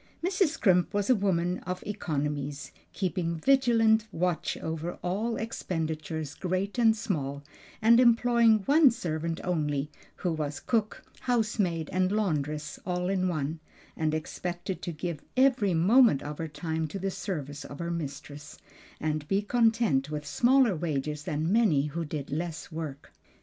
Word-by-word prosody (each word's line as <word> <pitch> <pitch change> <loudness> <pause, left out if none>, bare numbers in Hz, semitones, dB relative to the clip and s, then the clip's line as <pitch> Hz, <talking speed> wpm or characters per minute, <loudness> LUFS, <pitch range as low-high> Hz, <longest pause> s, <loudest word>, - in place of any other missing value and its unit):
Mrs. 375 0 +3
Scrimp 190 - +2
was 205 +4 +2
a - - +6
woman 180 -3 0
of 180 0 -5
economies, 150 -7 -3 0.2
keeping 180 -3 -1
vigilant 225 -1 +3
watch 180 -1 -1
over 160 +2 -4
all 215 +6 -1
expenditures, 160 -8 -3
great 185 +7 -2
and 225 -2 +5
small, 145 - -3 0.4
and 230 +2 +7
employing 235 -3 +4
one 295 0 +6
servant 165 -7 -3
only, 150 -4 -1 0.2
who 175 -3 -2
was 150 -2 -3
cook, 220 -3 -1 0.2
housemaid, 210 -9 0
and 185 +1 +2
laundress 150 -8 -1
all 180 0 -1
in 185 -1 +1
one, 155 -2 -2 0.4
and 155 -1 0
expected 175 +3 -4
to 175 - -3
give 160 -1 -4 0.2
every 250 -8 +4
moment 210 - +5
of 150 0 -6
her 165 - -2
time 160 +1 -3
to 155 - -6
the 195 0 -2
service 150 -7 -5
of 140 - -9
her 170 +1 -3
mistress, 145 -2 -6 0.4
and 155 -1 -2
be 195 +4 +1
content 225 - +2
with 150 -1 -4
smaller 245 - +3
wages 150 -2 -3
than 155 0 -1
many 205 -12 +4
who 160 +3 -3
did 150 -2 -5
less 165 +3 -4
work. 155 -4 -7
175 Hz, 145 wpm, -28 LUFS, 155-215 Hz, 0.4 s, and